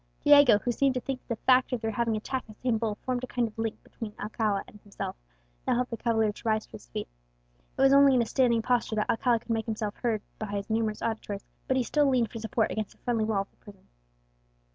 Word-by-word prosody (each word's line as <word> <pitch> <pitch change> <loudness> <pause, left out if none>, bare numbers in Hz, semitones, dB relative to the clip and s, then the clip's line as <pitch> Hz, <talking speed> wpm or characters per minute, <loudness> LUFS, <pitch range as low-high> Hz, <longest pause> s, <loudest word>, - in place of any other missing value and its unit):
Diego, 285 -7 +7
who 240 +4 -1
seemed 270 +2 +2
to - - +1
think 265 0 -4
that - - -38
the - - -38
fact 255 0 +5
of 250 - 0
their 225 -1 -2
having 230 0 0
attacked 255 +4 -3
the 215 - -12
same 240 -2 0
bull 220 -2 -1
formed 255 -1 -1
a - - -3
kind 245 -1 0
of 215 - -12
link 225 -1 -3
between 225 - -7
himself 210 -2 -2
and 210 - -15
Alcala, 205 -1 -6 0.5
now - - +3
helped 250 +1 -1
the 230 - -3
cavalier 220 -2 +1
to - - -13
rise 215 0 +1
to - - -32
his - - -11
feet. - - -5 0.7
It - - 0
was 270 0 +6
only 280 -1 +7
in 245 - +4
a - - -4
standing 235 -1 +2
posture 240 -2 +1
that 210 - 0
Aguilera 235 -1 +2
could 235 - -6
make 225 -1 0
himself 215 -2 -2
heard 225 -4 -1 0.2
by 215 - -3
his 200 +1 -4
numerous 220 -1 0
auditors, 215 -3 -3 0.2
but 260 - +2
he 255 - +2
still 290 +3 +2
leaned 245 -4 +2
for 230 - -6
support 225 +1 0
against 215 -1 -3
the - - -32
friendly 230 -3 +1
wall 215 -3 +1
of - - -25
the - - -36
prison. 200 -2 -16
225 Hz, 255 wpm, -28 LUFS, 215-250 Hz, 0.7 s, Diego